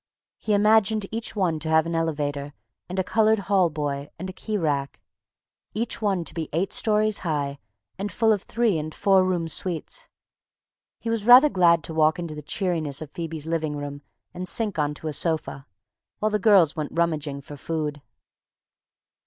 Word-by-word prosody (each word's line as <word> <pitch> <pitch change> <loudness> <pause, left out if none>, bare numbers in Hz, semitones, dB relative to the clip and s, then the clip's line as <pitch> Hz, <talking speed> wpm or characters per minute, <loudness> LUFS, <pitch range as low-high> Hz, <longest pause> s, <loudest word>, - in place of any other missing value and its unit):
He 210 - +1
imagined 215 0 +3
each 225 0 -4
one 175 -6 0
to 160 +1 -4
have 160 0 +4
an 170 - -3
elevator 145 -3 -2 0.3
and 185 - -5
a 190 - +2
colored 220 +3 +3
hall 195 -3 +2
boy 145 -2 -3
and 185 +2 -5
a - - -16
key 215 +2 -3
rack; 145 -6 -1 0.8
each 230 +1 -2
one 195 -5 +1
to - - -5
be 160 -2 -4
eight 180 +5 0
stories 215 -1 +2
high 145 -4 -2 0.4
and 200 +1 -3
full 225 -1 +3
of 205 - -2
three 220 -5 0
and 155 +1 -6
four 195 -2 +4
room 180 -3 0
suites. 180 - -3 0.9
He 230 - -4
was 225 -2 -1
rather 250 +6 +8
glad 170 - +4
to 160 - -7
walk 155 0 +3
into 170 -3 -5
the 150 - -7
cheeriness 160 -4 -2
of 155 -2 -8
Phoebe's 165 -3 -5
living 160 -2 -2
room 145 0 -6 0.3
and 180 +1 -5
sink 210 -6 -1
onto 150 +1 -2
a 155 - -2
sofa, 155 -4 -2 0.5
while 215 0 0
the 210 - +1
girls 185 -7 +5
went 155 -2 -4
rummaging 155 -4 -1
for 145 +1 -10
food. 150 0 -3
170 Hz, 180 wpm, -25 LUFS, 150-205 Hz, 0.9 s, rather